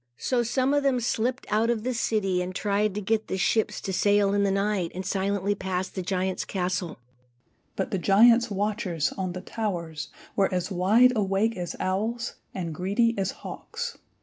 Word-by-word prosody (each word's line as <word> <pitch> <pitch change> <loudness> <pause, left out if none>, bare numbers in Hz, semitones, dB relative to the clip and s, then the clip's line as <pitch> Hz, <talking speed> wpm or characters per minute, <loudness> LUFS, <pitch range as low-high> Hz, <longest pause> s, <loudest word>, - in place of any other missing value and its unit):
So 250 -2 +1
some 260 +4 +1
of 290 - +3
them 270 -3 +2
slipped 240 +2 -1
out 220 +2 +2
of 230 -3 0
the 255 +1 -1
city 200 -5 0
and 180 +1 -4
tried 205 0 0
to 210 - -2
get 220 +2 0
the 190 - -2
ships 215 +3 +1
to 190 - -3
sail 205 +1 +3
in 205 - +2
the 200 - +2
night, 195 -3 0
and 185 +1 -4
silently 200 +1 0
pass 190 -1 -3
the 190 - -5
giant's 185 0 -1
castle. 180 -2 -2 0.8
But 190 - -2
the 195 - 0
giant's 230 +6 +5
watchers, 195 -7 -1
on 185 -2 -3
the 185 - -6
towers, 170 -10 -4 0.3
were 195 -1 +2
as 180 +2 -1
wide 215 +8 +5
awake 205 +2 +1
as 175 -2 -4
owls 220 +5 -1 0.2
and 170 -4 -4
greedy 205 +7 +1
as 195 -1 -1
hawks. 480 0 -6
200 Hz, 180 wpm, -26 LUFS, 185-225 Hz, 0.8 s, giant's